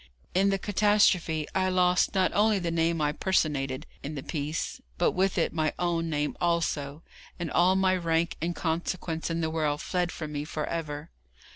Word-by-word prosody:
In 195 +2 +3
the 195 - +2
catastrophe 195 -6 +2
I 185 0 +1
lost 180 +1 +2
not 185 -1 +3
only 210 0 +3
the 175 -3 -2
name 165 0 +1
I 150 0 +2
personated 145 -6 0 0.2
in 150 +2 -5
the 140 - -5
piece, 150 0 -3 0.2
but - - +3
with 190 +1 +1
it 165 - +1
my 155 -2 0
own 170 -1 0
name 150 -1 -1
also, 165 -4 0 0.3
and 170 -2 -4
all 185 +2 +4
my 190 -1 +3
rank 165 -1 0
and 170 +1 -1
consequence 165 0 -2
in 165 0 -1
the 160 -1 -1
world 150 -2 0
fled 180 +1 -1
from 155 -2 -6
me 145 -1 -3
for 150 0 -3
ever. 155 -2 -4
165 Hz, 180 wpm, -28 LUFS, 155-185 Hz, 0.3 s, all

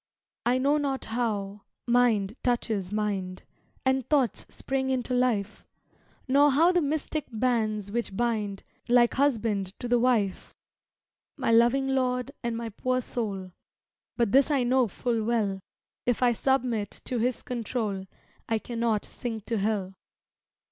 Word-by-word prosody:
I 250 +1 +3
know 280 +3 +3
not 275 -2 -2
how 210 -4 -2 0.2
mind 235 -4 +2
touches 220 -6 -1
mind 200 -3 -2 0.4
And 265 0 +2
thoughts 270 -8 +1
spring 265 0 -2
into 255 -1 -1
life; 225 -5 0 0.6
Nor 285 +2 +5
know 330 +5 +5
the 355 -1 +2
mystic 305 0 -2
bands 215 -3 0
which 230 -4 -3
bind, 215 -5 -1 0.3
Like 240 -1 +5
husband 220 -8 0
to 245 - -4
the 240 0 +3
wife, 230 -6 0 0.8
My - - 0
loving 240 +4 +4
Lord 255 -1 0
and 235 -1 -2
my 230 -1 -4
poor 255 +4 -1
soul, 200 -7 -4 0.7
But 235 -4 +2
this 275 +4 +5
I 280 -4 +2
know 250 0 +3
full 230 +3 -1
well, 215 -4 0 0.5
If 245 +1 +2
I 245 - +5
submit 240 -4 0 0.2
to 250 - -1
His 245 +2 0
control 225 -5 -3 0.4
I 225 - +2
cannot 230 -2 -1
sink 225 -4 -5
to 230 -3 -1
hell. 195 -2 -1
235 Hz, 140 wpm, -27 LUFS, 210-255 Hz, 0.8 s, Nor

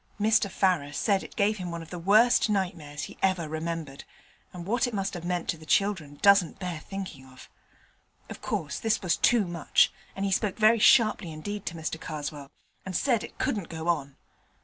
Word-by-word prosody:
Mr 215 -1 +3
Farrer 180 -7 +1
said 195 +5 +1
it - - -11
gave 210 +1 +1
him 180 -1 -4
one 170 -1 -5
of 165 - -15
the 180 - -5
worst 215 +7 +4
nightmares 170 -7 -2
he - - -9
ever 185 -4 +1
remembered, 160 -2 -5 0.5
and 175 -2 -8
what 235 +5 +1
it 240 - -5
must 195 -1 -2
have 175 -2 -6
meant 175 -1 -2
to 165 - -2
the - - -13
children 175 -9 0
doesn't 200 -4 +5
bear 180 -4 -4
thinking 185 -6 -7
of. 130 -1 -15 0.8
Of - - -9
course 150 -3 -3
this 220 -1 0
was 180 - +2
too 235 -4 +3
much, 170 -3 +2 0.2
and 195 - -2
he 195 - -1
spoke 195 0 0
very 220 +1 +5
sharply 215 -6 +4
indeed 205 +6 -6
to 170 - -3
Mr 160 0 -5
Karswell, 145 -2 -6 0.3
and 190 -2 -6
said 240 -1 +1
it - - -10
couldn't 200 -7 -2
go 160 +1 -4
on. 140 -5 -1
180 Hz, 195 wpm, -27 LUFS, 160-205 Hz, 0.8 s, doesn't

